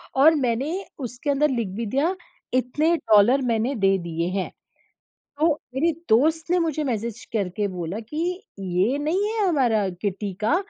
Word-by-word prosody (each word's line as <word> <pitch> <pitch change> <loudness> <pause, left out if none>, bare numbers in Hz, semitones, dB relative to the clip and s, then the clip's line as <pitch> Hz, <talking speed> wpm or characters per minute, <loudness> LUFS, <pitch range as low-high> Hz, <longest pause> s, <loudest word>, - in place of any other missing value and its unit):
और 300 +4 +6
मैंने 260 +1 0 0.3
उसके 250 +2 -5
अंदर 290 +2 +3
लिख 235 -5 -1
भी 230 +2 -3
दिया 280 - 0 0.4
इतने 295 +7 +2
डॉलर 225 +2 +4
मैंने 230 +4 +1
दे 195 -3 +3
दिए 170 0 -2
हैं। 190 0 -2 0.9
तो 315 - +4 0.3
मेरे 325 +6 +2 0.2
दोस्त 315 +8 +3
ने 360 - +4
मुझे 315 -3 0
मैसेज 235 -3 -3
करके 205 -1 -1
बोला 180 +1 -4
कि, 330 - -3 0.2
"ये 190 +7 +1
नहीं 320 +8 0
है 435 -3 +1
हमारा 240 - +2
किट्टी 200 -1 -2
का, 255 +10 +3
250 Hz, 155 wpm, -24 LUFS, 205-305 Hz, 0.9 s, और